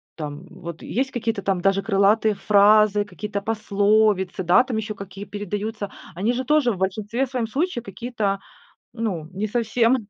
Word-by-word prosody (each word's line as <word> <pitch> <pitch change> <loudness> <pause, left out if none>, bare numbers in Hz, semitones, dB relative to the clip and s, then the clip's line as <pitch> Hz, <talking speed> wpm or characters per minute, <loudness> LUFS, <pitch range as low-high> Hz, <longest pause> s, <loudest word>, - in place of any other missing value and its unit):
там 150 +2 -7
вот 170 -1 -9
есть 265 +2 -2
какие-то 225 -4 -2
там 190 -2 0
даже 195 +1 +2
крылатые 210 +1 +3
фразы, 210 0 +4
какие-то 205 +1 -5
пословицы, 205 -2 +2
да, 180 +8 +5
там 255 -3 -4
еще 215 -1 -3
какие 200 0 -8
передаются. 205 +1 -4 0.2
Они 205 +7 0
же 255 +1 -2
тоже 290 -2 +3
в 200 - -4
большинстве 210 +7 -1
своем 250 -2 -2
случае 275 +1 -1
какие-то, 205 -2 -2 0.5
ну, 210 -9 -3
не 200 +3 -2
совсем 230 +1 +1
210 Hz, 155 wpm, -23 LUFS, 195-230 Hz, 0.5 s, да